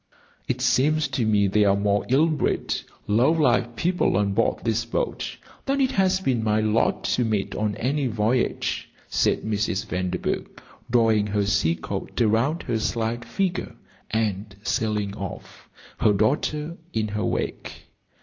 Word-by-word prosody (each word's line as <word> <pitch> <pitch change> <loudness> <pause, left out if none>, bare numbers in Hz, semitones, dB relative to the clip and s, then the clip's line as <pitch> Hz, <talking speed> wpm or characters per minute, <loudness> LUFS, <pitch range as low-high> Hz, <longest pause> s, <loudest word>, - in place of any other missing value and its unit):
"It 125 -1 -1
seems 140 +5 +3
to 125 -4 0
me 105 -2 +3
there 100 +1 +3
are 100 - +4
more 100 0 +1
ill 135 +5 +5
bred, 155 -3 0 0.3
low 115 +8 +3
lived 125 -7 +2
people 180 - +1
on 100 -1 +1
board 115 - +1
this 115 0 +1
boat 115 - -3 0.3
than 275 +1 +1
it 265 -1 +2
has 190 -1 +2
been 130 -11 0
my 110 0 +2
lot 110 +1 +1
to 125 - +1
meet 110 -3 -1
on 105 -1 -1
any 140 +2 0
voyage," 115 +2 0 0.2
said - - +1
Mrs. 105 -3 -1
Vanderburgh, 90 0 -3 0.3
drawing 115 -3 +3
her 105 0 0
sea 95 -5 +2
coat 80 - -5
around 120 +9 +2
her 115 - -1
slight 115 +2 -1
figure 175 +1 -2 0.3
and 105 -2 -2
sailing 105 -3 -1
off, 100 -2 -8 0.3
her 105 - +4
daughter 150 - 0 0.2
in 110 -1 0
her 105 +1 -2
wake. - - -3
115 Hz, 150 wpm, -24 LUFS, 105-130 Hz, 0.3 s, ill